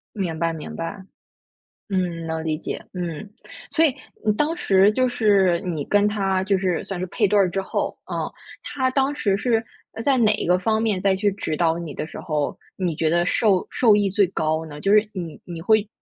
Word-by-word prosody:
明 175 -6 -2
白 165 0 0
明 160 -2 -7
白。 190 +4 -5 0.9
嗯， 175 -4 -2
能 160 0 -3
理 155 -1 -1
解， - - -6
嗯。 175 +1 -5 0.4
所 325 - +3
以， 280 - +3 0.3
嗯， 210 -1 +3
当 310 +6 0
时 195 - +4
就 255 +3 +1
是 200 -7 +3
你 160 -6 -3
跟 205 0 +3
他 195 -3 0
就 195 0 +1
是 185 -3 0
算 195 - -5
是 185 - -2
配 205 +2 +1
对 210 - +3
儿 195 -2 +4
之 195 +2 -2
后， - - -2
嗯， - - -2 0.4
他 260 -2 -1
当 270 +2 +1
时 200 -8 +1
是， 225 +2 +1 0.3
呃， 225 - -6
在 275 +2 +3
哪 215 -3 +4
一 - - -3
个 180 +1 +4
方 220 +3 +1
面 210 -5 0
再 195 0 +3
去 200 +2 +1
指 160 -5 -3
导 165 -1 +2
你 165 -4 -6
的 - - -3
时 160 - -9
候， 150 -3 -2 0.2
你 180 -4 -2
觉 160 - +1
得 175 +2 +2
受 195 0 +2
受 225 -4 +4
益 205 -1 +2
最 200 +1 +3
高 160 -2 -1
呢？ 150 -1 -9
就 195 +5 +2
是 210 0 +5
你 170 -5 -6
你 170 -2 -7
会 215 +1 +3
190 Hz, 230 characters per minute, -23 LUFS, 170-210 Hz, 0.9 s, 是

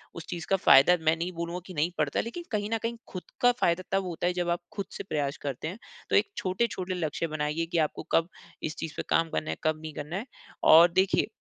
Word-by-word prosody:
उस 170 - -7
चीज़ 170 -2 -5
का 195 - +4
फायदा 175 0 +7
मैं 160 +1 +4
नहीं 170 +2 -3
बोलूँगा 170 +1 -3
कि 185 - -9
नहीं 155 +4 +1
पड़ता 150 -2 0
है, - - +1
लेकिन 345 +10 -6
कहीं 210 -1 -1
न - - +2
कहीं 230 +1 -1
खुद 185 - -6 0.2
का 245 - +6
फायदा 170 +2 +2
तब 195 0 +2
होता 175 -1 -2
है 180 - +1
जब 175 -1 -1
आप 170 - +1
खुद 200 - -3
से - - -6
प्रयास 145 -6 -2
करते 140 +1 -4
हैं। 180 +5 -5 0.3
तो - - +2
एक 410 - +3
छोटे-छोटे 185 -1 -1
लक्ष्य 165 -1 -2
बनाइए 155 +1 -1
कि 175 - 0
आपको 150 - -4
कब 165 +1 +3 0.3
इस 155 - -3
चीज़ 160 -1 -5
पे - - -2
काम 165 0 +2
करना 155 - -2
है, - - -2
कब 155 0 +1
नहीं 155 -1 -7
करना 150 +4 -6
है। 215 - -4 0.4
और 170 +2 +8
देखिए, 190 +3 +2
170 Hz, 255 wpm, -28 LUFS, 155-185 Hz, 0.4 s, और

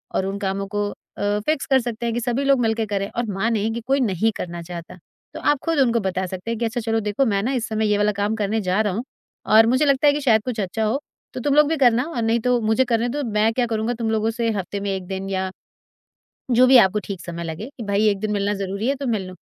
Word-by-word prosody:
और 190 - +1
उन 195 +1 -3
कामों 195 0 -2
को 205 +1 -2 0.3
अ, 205 +1 0
फ़िक्स 310 -2 0
कर 265 -1 +4
सकते 235 -1 -4
हैं 230 - 0
कि 240 - -1
सभी 245 +3 -1
लोग 275 -1 +4
मिलके 225 -1 +1
करें 200 -1 -2
और 240 - -3
मानें 220 +2 0
कि 235 - -3
कोई 275 +1 +2
नहीं 225 -2 +1
करना 170 -1 -5
चाहता, 170 +1 -8 0.4
तो - - -6
आप 290 - +2
खुद 330 -3 +1
उनको 235 -3 +3
बता 190 -2 -2
सकते 185 +4 -5
हैं 230 - -2
कि, 235 - 0
"अच्छा, 235 +2 -2
चलो, 225 0 0
देखो, 210 +5 0
मैं 200 -4 +1
ना 250 - 0
इस 245 -3 -1
समय 220 0 0
ये 205 - +3
वाला 210 0 +2
काम 205 +2 0
करने 215 0 -1
जा 185 +2 +1
रहा 205 -3 0
हूँ 225 +6 -3 0.4
और 220 +1 +6
मुझे 260 +5 +3
लगता 280 +1 +3
है 290 - +6
कि 295 - -2
शायद 225 -6 +4
कुछ 245 -3 -3
अच्छा 205 +3 -2
हो, 220 +6 +1 0.3
तो - - -5
तुम 280 +3 0
लोग 300 0 +6
भी 320 - 0
करना 240 +1 +4
और 315 -8 -4
नहीं, 225 +1 +2
तो 245 +1 +1
मुझे 220 +4 +2
करने 235 0 0
दो। 290 +4 -2
मैं 210 +1 +2
क्या 245 +1 +1
करूँगा, 225 0 -1
तुम 230 -1 -3
लोगों 220 0 +1
से 230 0 -1
हफ़्ते 195 +2 -4
में 200 0 -3
एक 185 -1 -7
दिन 195 0 -4
या 190 -1 -1 1.0
जो 250 +1 +5
भी 260 +1 +7
आपको 190 +3 -2
ठीक 195 -3 -6
समय 170 0 -5
लगे, 165 +8 -5
कि - - -5
भई, 200 +2 +2
एक 200 -1 +1
दिन 215 0 -2
मिलना 205 0 0
ज़रूरी 200 +4 -2
है, 275 - +2
तो 280 0 -5
मिल 215 -6 -1
लो।" 185 - -9
220 Hz, 275 wpm, -22 LUFS, 200-245 Hz, 1.0 s, भी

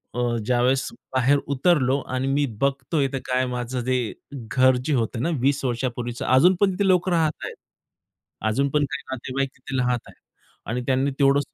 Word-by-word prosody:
अ, 125 - -1 0.2
ज्यावेळेस 125 +2 +2 0.3
बाहेर 130 +3 +4 0.2
उतरलो 140 -3 +3 0.2
आणि 130 +1 -1
मी 145 +1 +2 0.2
बघतोय 140 +2 +1
इथं 135 0 -2
काय 130 0 +1
माझं 125 +1 -3
जे 130 +1 +1 0.4
घर 130 +1 +2
जे 155 - +1
होतं 115 -1 -1
ना 170 - +1
20 140 +1 +1
वर्षांपूर्वीचं 120 -1 -3
अजून 170 +9 +5
पण 200 -2 +4
तिथे 195 +1 0
लोकं 180 0 +3
राहत 160 -3 +3
आहेत. - - -6 0.9
अजून 140 +6 +1
पण 150 +1 +2
काही 150 - -3
नातेवाईक 130 +1 -2
तिथे 130 0 -5
राहात 125 -1 +1
आहेत - - -17 0.5
आणि 125 +2 -1
त्यांनी 135 +1 +2
तेवढं 140 0 +5
130 Hz, 170 wpm, -24 LUFS, 125-145 Hz, 0.9 s, अजून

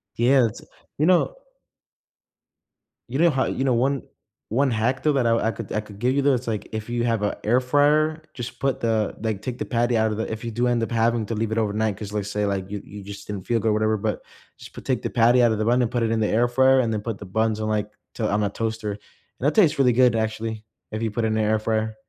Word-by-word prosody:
Yeah, 125 +2 +4
it's 105 - -9 0.4
you 150 - +2
know 185 - +3 1.7
you 130 +4 -3
know 170 +1 +5
how 135 -4 +1
you 135 - -2
know, 130 -2 +2
one 130 +3 +1 0.5
one 135 +4 +2
hack 120 +4 0
though, 150 - +3
that 135 -3 +1
I 115 -1 +2
could 100 - -8
I 110 - 0
could 105 -2 -10
give 125 +3 +1
you 140 - +2
though, 140 0 +3
it's 125 -1 -2
like, 110 -3 -3
if 110 +1 -5
you 120 0 -1
have 115 -3 0
a 105 - -1
air 120 +4 +4
fryer, 150 +4 +2
just 120 -1 -7
put 135 -1 0
the 110 -2 0
like 110 -3 -2
take 125 +1 -5
the - - -2
patty 120 0 +1
out 110 0 +2
of 105 - -3
the 110 - -3
if 110 +1 -5
you 115 - -4
do 120 +2 0
end 120 -1 +1
up 115 - -3
having 115 0 +1
to 115 - -3
leave 110 0 -2
it 110 - -1
overnight, 110 -1 0
'cause 105 -1 -7
let's 105 -1 -2
say, 105 0 0
like, 100 -1 -2
you 100 0 -5
you 100 0 -10
just 100 +1 -9
didn't 100 -3 -6
feel 120 -1 +2
good 110 - 0
or - - +2
whatever, 110 0 +1
but - - -2 0.4
just - - -13
p - - -9
take - - -1
the - - -3
patty 120 +2 +4
out 120 -1 +4
of 110 - 0
the 110 - -1
bun 120 +2 +3
and 120 - 0
put 120 -2 0
it 115 - 0
in 115 - +1
the 110 - +1
air 120 +4 +2
fryer 130 +2 +4
and 115 -3 +1
then 105 - -2
put 115 -1 -4
the 100 - -9
buns 110 +3 0
in 110 - -2
like, 105 -1 -1 0.2
t 115 - -5
on 105 0 +1
a 100 - +1
toaster, 110 0 -3
and 100 - -7 0.4
that 145 +4 +1
tastes 170 -10 +4
really 125 -3 +4
good 125 -1 +4
actually, 110 0 -3 0.3
if 110 +1 -4
you 115 -1 -1
put 115 +3 -2
it - - +2
in 110 - 0
the 110 - +1
air 110 0 +2
fryer. 110 0 -1
115 Hz, 280 wpm, -24 LUFS, 110-125 Hz, 1.7 s, know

